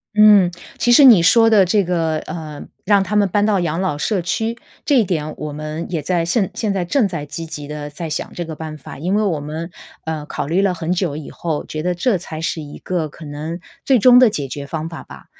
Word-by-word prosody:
嗯， 210 Hz, -4 st, +6 dB, 0.3 s
其 240 Hz, -, +2 dB
实 265 Hz, +4 st, +7 dB
你 235 Hz, -9 st, +8 dB
说 225 Hz, +7 st, +5 dB
的 210 Hz, -3 st, +6 dB
这 200 Hz, +3 st, +2 dB
个， 165 Hz, -3 st, 0 dB
呃， 155 Hz, -3 st, -7 dB, 0.2 s
让 200 Hz, -1 st, +3 dB
他 210 Hz, -, -3 dB
们 205 Hz, -2 st, +3 dB
搬 205 Hz, +3 st, +2 dB
到 210 Hz, -2 st, +2 dB
养 165 Hz, -1 st, -1 dB
老 185 Hz, -5 st, -1 dB
社 185 Hz, +6 st, -1 dB
区， 225 Hz, +6 st, -2 dB, 0.3 s
这 285 Hz, -3 st, +3 dB
一 -, -, +4 dB
点 155 Hz, -5 st, -3 dB
我 150 Hz, -1 st, -5 dB
们 155 Hz, +2 st, -5 dB
也 165 Hz, -3 st, -1 dB
在 170 Hz, +2 st, 0 dB
现 190 Hz, +3 st, +1 dB
现 210 Hz, -3 st, -1 dB
在 190 Hz, -, -1 dB
正 215 Hz, +6 st, +1 dB
在 165 Hz, -6 st, -5 dB
积 150 Hz, +3 st, -6 dB
极 150 Hz, -2 st, -7 dB
地 150 Hz, 0 st, -6 dB
在 160 Hz, +3 st, -6 dB
想 155 Hz, -, -4 dB
这 175 Hz, -, -4 dB
个 160 Hz, -1 st, -7 dB
办 155 Hz, 0 st, -7 dB
法。 140 Hz, -3 st, -11 dB
因 175 Hz, +6 st, -2 dB
为 210 Hz, -, +2 dB
我 170 Hz, -7 st, 0 dB
们， 155 Hz, +3 st, -6 dB, 0.4 s
呃， 160 Hz, -2 st, -4 dB
考 145 Hz, -, -4 dB
虑 180 Hz, +5 st, +1 dB
了 190 Hz, -2 st, +2 dB
很 165 Hz, 0 st, -4 dB
久 175 Hz, -5 st, -1 dB
以 150 Hz, -2 st, -7 dB
后， 160 Hz, -3 st, -3 dB
觉 155 Hz, 0 st, -6 dB
得 180 Hz, +1 st, 0 dB
这 190 Hz, +4 st, +1 dB
才 160 Hz, -3 st, -7 dB
是 165 Hz, -, -2 dB
一 145 Hz, -2 st, -9 dB
个 175 Hz, -4 st, -2 dB
可 155 Hz, +2 st, -13 dB
能 150 Hz, +4 st, -6 dB, 0.3 s
最 260 Hz, -4 st, +4 dB
终 250 Hz, +2 st, +7 dB
的 250 Hz, -3 st, +6 dB
解 145 Hz, -7 st, -3 dB
决 140 Hz, +2 st, -6 dB
方 160 Hz, +2 st, -5 dB
法 165 Hz, -, -8 dB
吧。 -, -, -13 dB
170 Hz, 265 characters per minute, -19 LUFS, 155-200 Hz, 0.4 s, 你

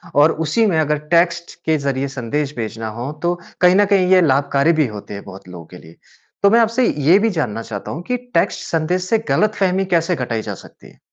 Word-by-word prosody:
और 150 Hz, +3 st, +5 dB
उसी 220 Hz, +9 st, +2 dB
में 180 Hz, -6 st, +1 dB
अगर 150 Hz, -1 st, +1 dB, 0.2 s
टेक्स्ट 170 Hz, 0 st, +1 dB
के 160 Hz, -1 st, +2 dB
ज़रिये 140 Hz, -1 st, -2 dB
संदेश 140 Hz, +4 st, -3 dB
भेजना 110 Hz, 0 st, -4 dB
हो, 130 Hz, +4 st, -4 dB
तो 175 Hz, 0 st, +2 dB, 0.3 s
कहीं 180 Hz, 0 st, +5 dB
न 205 Hz, +1 st, +5 dB
कहीं 185 Hz, -2 st, +3 dB
ये 185 Hz, -1 st, +6 dB
लाभकारी 140 Hz, +1 st, +2 dB
भी 145 Hz, -, +2 dB
होते 105 Hz, -2 st, -9 dB
हैं 100 Hz, -, -7 dB
बहुत 95 Hz, 0 st, -12 dB
लोगों 90 Hz, -2 st, -10 dB
के 90 Hz, -, -13 dB
लिए। 80 Hz, -1 st, -16 dB, 0.5 s
तो 200 Hz, -, +7 dB
मैं 230 Hz, +3 st, +4 dB
आपसे 230 Hz, +2 st, +2 dB, 0.2 s
ये 190 Hz, -, +7 dB
भी 225 Hz, +2 st, +2 dB
जानना 115 Hz, -6 st, -2 dB
चाहता 105 Hz, -3 st, -7 dB
हूँ 165 Hz, +4 st, -6 dB
कि 250 Hz, 0 st, 0 dB, 0.2 s
टेक्स्ट 165 Hz, -, +1 dB
संदेश 170 Hz, +3 st, 0 dB
से 225 Hz, -, +3 dB
गलतफ़हमी 195 Hz, -3 st, +1 dB
कैसे 170 Hz, +1 st, +1 dB
घटाई 120 Hz, -4 st, -3 dB
जा -, -, -6 dB
सकती -, -, -16 dB
है? -, -, -24 dB
155 Hz, 220 wpm, -19 LUFS, 120-185 Hz, 0.5 s, तो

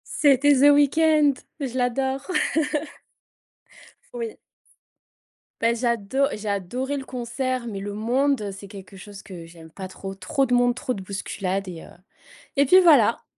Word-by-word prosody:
C'était 285 Hz, 0 st, +4 dB
The 285 Hz, +2 st, +6 dB
Weeknd, 295 Hz, 0 st, +4 dB, 0.3 s
je 260 Hz, -2 st, -4 dB
l'adore. 265 Hz, +2 st, -1 dB, 1.9 s
Oui. 465 Hz, -2 st, -5 dB, 1.2 s
Beh 230 Hz, +1 st, +2 dB
j'ado 235 Hz, +2 st, 0 dB
j'ai 210 Hz, 0 st, -5 dB
adoré 250 Hz, +9 st, -3 dB
le 270 Hz, -, -6 dB
concert, 250 Hz, 0 st, -3 dB
mais 200 Hz, -3 st, -5 dB
le 200 Hz, +1 st, -5 dB
monde, 240 Hz, 0 st, 0 dB
c'est 195 Hz, +1 st, -10 dB
quelque 195 Hz, -1 st, -12 dB
chose 200 Hz, +1 st, -11 dB
que 175 Hz, -4 st, -10 dB
j'aime 165 Hz, -1 st, -14 dB
pas 190 Hz, +1 st, -7 dB
trop. 195 Hz, +1 st, -8 dB
Trop 270 Hz, +9 st, 0 dB
de 250 Hz, -, -2 dB
monde, 245 Hz, 0 st, +3 dB
trop 255 Hz, 0 st, -3 dB
de 195 Hz, -, -7 dB
bousculades 195 Hz, 0 st, -4 dB
et 170 Hz, -3 st, -8 dB
heu -, -, -13 dB, 0.7 s
et 280 Hz, -, +5 dB
puis 370 Hz, +7 st, +7 dB
voilà. 280 Hz, -10 st, +5 dB
240 Hz, 150 wpm, -24 LUFS, 200-275 Hz, 1.9 s, puis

